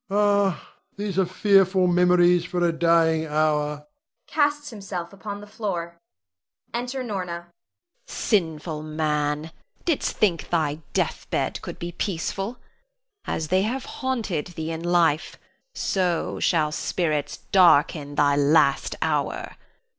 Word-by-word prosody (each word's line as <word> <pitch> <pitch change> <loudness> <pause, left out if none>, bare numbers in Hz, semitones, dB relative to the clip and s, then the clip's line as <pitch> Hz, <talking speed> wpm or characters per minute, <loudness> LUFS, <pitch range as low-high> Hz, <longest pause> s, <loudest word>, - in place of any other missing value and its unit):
Rod. 200 -1 +3
Ah, - - -18 0.3
these 200 -2 -2
are 190 - +3
fearful 190 0 +3
memories 180 0 +4
for 175 0 -1
a 170 - +3
dying 160 -1 +3
hour! 150 -1 0 0.4
[Casts 290 -1 0
himself 195 -4 -6
upon 205 +1 -7
the - - -9
floor.] 175 -5 -4 0.7
[Enter 250 +2 -3
Norna. 190 -7 -3
Norna. 175 0 -11 0.5
Sinful 160 -6 -1
man, 155 0 -1 0.3
didst 330 -5 0
think 185 -6 +1
thy 155 -3 0
death - - -1
bed - - -1
could - - -7
be 170 0 -5
peaceful? 195 +5 -3 0.7
As 155 -1 -3
they 185 +2 +3
have 245 +6 -2
haunted 230 - -2
thee 165 -2 -5
in 165 0 -4
life, 170 -2 +2 0.4
so 180 -3 -1
shall 155 -4 +2
spirits 155 -2 -1
darken 150 -5 +4
thy 145 -1 +3
last 145 -1 +3
hour. - - -1
175 Hz, 125 wpm, -24 LUFS, 155-200 Hz, 0.7 s, memories